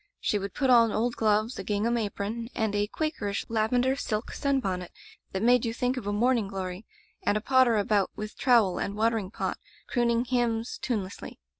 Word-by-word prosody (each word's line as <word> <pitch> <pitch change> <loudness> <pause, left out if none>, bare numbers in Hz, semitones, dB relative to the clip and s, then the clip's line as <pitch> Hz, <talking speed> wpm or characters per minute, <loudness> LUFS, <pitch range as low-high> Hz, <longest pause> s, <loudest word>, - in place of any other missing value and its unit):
She 210 - 0
would 200 -1 -6
put 265 -2 +2
on 230 -2 +6
old 235 +3 0
gloves, 215 +2 +1
a - - -4
gingham 215 +3 0
apron, 225 +1 -3
and 220 -2 0
a 205 0 +1
Quakerish 210 -8 -3
lavender 245 +4 +2
silk 215 -4 -3
sunbonnet 195 -11 -1 0.4
diat 190 +2 -2
made 245 0 +5
you 230 -1 -2
think 250 +1 0
of 240 -6 -5
a - - 0
morning 230 0 +2
glory, 190 0 -5 0.3
and 210 - 0
potter 260 -4 +4
about 205 -1 +2
with 215 0 -6
trowel 230 -8 +3
and 200 - -3
watering 220 -2 0
pot, - - -3 0.3
crooning 235 -1 +1
hymns, 240 -2 -1
tune 225 -6 -1
lessly. 185 +3 -9
225 Hz, 180 wpm, -28 LUFS, 205-245 Hz, 0.4 s, on